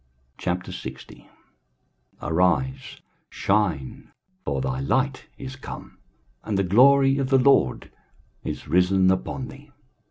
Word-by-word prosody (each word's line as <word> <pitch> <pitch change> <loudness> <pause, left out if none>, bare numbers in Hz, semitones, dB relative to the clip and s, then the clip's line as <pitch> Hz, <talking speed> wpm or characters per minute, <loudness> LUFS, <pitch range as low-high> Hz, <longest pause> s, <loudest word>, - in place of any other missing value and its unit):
23:060:001 90 -7 -6 0.9
Arise, 90 - 0 0.3
shine; 95 -10 -1 0.3
for - - -2
thy 135 0 -2
light 135 0 0
is 130 -1 -7
come, 135 - -10 0.4
and 105 -3 -2
the 100 - +2
glory 135 +7 +5
of 135 -1 -1
the 135 - +5
LORD 130 - +3 0.5
is - - -5
risen 90 +3 +3
upon 125 +7 -2
thee. 145 +2 -14
125 Hz, 105 wpm, -24 LUFS, 90-135 Hz, 0.9 s, glory